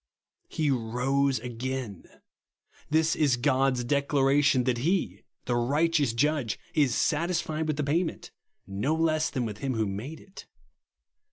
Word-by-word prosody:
He 150 Hz, -3 st, 0 dB
rose 130 Hz, +3 st, 0 dB
again. 125 Hz, -4 st, -5 dB, 0.8 s
This 160 Hz, +1 st, +2 dB
is 140 Hz, -5 st, +2 dB
God's 130 Hz, -1 st, +1 dB
declaration 140 Hz, 0 st, +2 dB
that 120 Hz, -1 st, 0 dB
he, 175 Hz, +8 st, -1 dB, 0.2 s
the 120 Hz, -, 0 dB
righteous 145 Hz, +3 st, +2 dB
Judge, 135 Hz, -2 st, 0 dB, 0.2 s
is 140 Hz, -6 st, +2 dB
satisfied 160 Hz, -1 st, 0 dB
with 155 Hz, -2 st, -1 dB
the 150 Hz, -, 0 dB
pay 155 Hz, +6 st, +1 dB
ment, 165 Hz, -, -7 dB, 0.3 s
no 105 Hz, +11 st, -1 dB
less 155 Hz, -1 st, +1 dB
than 125 Hz, -3 st, -2 dB
with 105 Hz, -2 st, -6 dB
him 135 Hz, -2 st, -2 dB
who 110 Hz, -1 st, +1 dB
made 110 Hz, +11 st, -5 dB
it. 190 Hz, -, -13 dB
135 Hz, 140 wpm, -27 LUFS, 125-155 Hz, 0.8 s, This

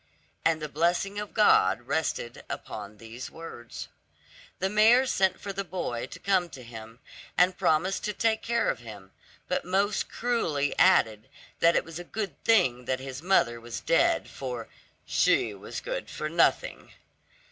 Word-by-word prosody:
And 165 Hz, -1 st, +2 dB
the 155 Hz, -, -4 dB
blessing 175 Hz, +7 st, 0 dB
of 210 Hz, -1 st, -6 dB
God 115 Hz, -, +4 dB
rested 135 Hz, -5 st, -2 dB
upon 105 Hz, 0 st, -7 dB
these 115 Hz, +3 st, -8 dB
words. 160 Hz, -8 st, -9 dB, 0.7 s
The 190 Hz, -, 0 dB
mayor 220 Hz, +6 st, +5 dB
sent 190 Hz, -7 st, +1 dB
for 200 Hz, -, -5 dB
the 195 Hz, +1 st, -3 dB
boy 170 Hz, -10 st, -4 dB
to -, -, -10 dB
come 190 Hz, -3 st, +1 dB
to 130 Hz, -5 st, -10 dB
him, 115 Hz, -1 st, -10 dB, 0.4 s
and 180 Hz, +1 st, +4 dB
promised 180 Hz, +1 st, +1 dB
to 210 Hz, -, -1 dB
take 220 Hz, +1 st, +1 dB
care 235 Hz, 0 st, 0 dB
of 125 Hz, -, -7 dB
him, 105 Hz, -5 st, -11 dB, 0.4 s
but -, -, -1 dB
most 195 Hz, +3 st, 0 dB
cruelly 165 Hz, -, 0 dB
added 115 Hz, -, +4 dB, 0.3 s
that 170 Hz, 0 st, +5 dB
it -, -, +2 dB
was 165 Hz, +1 st, -8 dB
a -, -, -6 dB
good 205 Hz, +3 st, -5 dB
thing 125 Hz, -, +3 dB
that 130 Hz, +1 st, -1 dB
his 135 Hz, +1 st, -7 dB
mother 120 Hz, -10 st, +2 dB
was 115 Hz, -1 st, -6 dB
dead, -, -, +2 dB
for 125 Hz, -4 st, -6 dB, 0.4 s
"she 110 Hz, -, +2 dB
was 100 Hz, +1 st, -7 dB
good -, -, -4 dB
for 155 Hz, -, -4 dB
nothing." 170 Hz, +1 st, +1 dB
160 Hz, 160 wpm, -28 LUFS, 120-195 Hz, 0.7 s, mayor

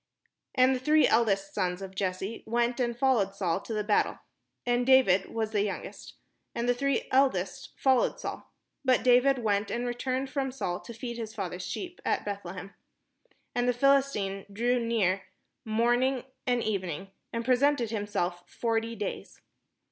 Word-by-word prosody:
And 255 Hz, +1 st, +5 dB
the 255 Hz, -, -1 dB
three 305 Hz, +4 st, +4 dB
eldest 200 Hz, -4 st, +2 dB
sons 180 Hz, -2 st, -1 dB
of 190 Hz, -1 st, -7 dB
Jesse 190 Hz, +3 st, -3 dB
went 240 Hz, +2 st, +1 dB
and 240 Hz, -2 st, 0 dB
followed 235 Hz, -7 st, +2 dB
Saul 185 Hz, -3 st, 0 dB
to 215 Hz, -, -10 dB
the 215 Hz, -1 st, -1 dB
battle: 210 Hz, 0 st, +2 dB, 0.5 s
and 245 Hz, 0 st, +2 dB
David 245 Hz, -8 st, +5 dB
was 220 Hz, -1 st, -2 dB
the 210 Hz, -2 st, +1 dB
youngest: 200 Hz, -1 st, -5 dB, 0.4 s
and 235 Hz, +1 st, -1 dB
the 245 Hz, -, +4 dB
three 275 Hz, +2 st, 0 dB
eldest 260 Hz, -9 st, +1 dB
followed 260 Hz, -2 st, +2 dB
Saul. -, -, -6 dB, 0.3 s
But 260 Hz, -2 st, +3 dB
David 255 Hz, +2 st, +5 dB
went 210 Hz, -3 st, 0 dB
and 240 Hz, +1 st, -2 dB
returned 255 Hz, +2 st, -2 dB
from 270 Hz, -2 st, -1 dB
Saul 180 Hz, -9 st, -3 dB
to 235 Hz, -, -10 dB
feed 235 Hz, 0 st, -5 dB
his 220 Hz, -1 st, -6 dB
father's 180 Hz, -3 st, -4 dB
sheep 355 Hz, -, -6 dB
at -, -, 0 dB
Beth 200 Hz, -1 st, -4 dB
lehem. 185 Hz, +2 st, -8 dB, 0.8 s
And 245 Hz, 0 st, 0 dB
the 245 Hz, -, +1 dB
PhiHstine 245 Hz, -8 st, +1 dB
drew 240 Hz, +4 st, +1 dB
near 200 Hz, -5 st, +1 dB, 0.4 s
morning 240 Hz, +4 st, +2 dB, 0.2 s
and 245 Hz, -1 st, +2 dB
evening, 190 Hz, -3 st, -3 dB, 0.2 s
and 230 Hz, 0 st, -3 dB
presented 255 Hz, -2 st, +3 dB
himself 185 Hz, -5 st, -2 dB
forty 230 Hz, 0 st, -1 dB
days. 205 Hz, -2 st, -5 dB
230 Hz, 160 wpm, -29 LUFS, 195-250 Hz, 0.8 s, And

